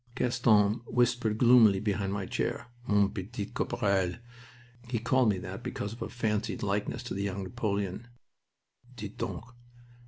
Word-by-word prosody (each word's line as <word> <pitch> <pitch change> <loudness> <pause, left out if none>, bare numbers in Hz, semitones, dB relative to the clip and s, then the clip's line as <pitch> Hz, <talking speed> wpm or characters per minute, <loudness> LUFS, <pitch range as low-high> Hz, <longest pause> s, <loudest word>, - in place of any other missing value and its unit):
Gaston 110 -4 +3
whispered 120 -3 +1
gloomily 115 -5 +6
behind 100 -1 -1
my 100 -1 -2
chair: 120 - -3 0.2
"Mon 100 -1 +3
petit 105 +1 -5
caporal" 95 -2 0 0.7
he 120 -1 -1
called 120 +1 +3
me 100 - +1
that 90 - -6
because 100 +1 -4
of 115 - -12
a - - -3
fancied 105 -3 -2
likeness 105 +1 -1
to - - -5
the 100 - -3
young 100 -1 -2
Napoleon 100 0 -3 0.9
"dites 105 -3 -7
donc. 90 -3 -4
105 Hz, 145 wpm, -30 LUFS, 100-115 Hz, 0.9 s, gloomily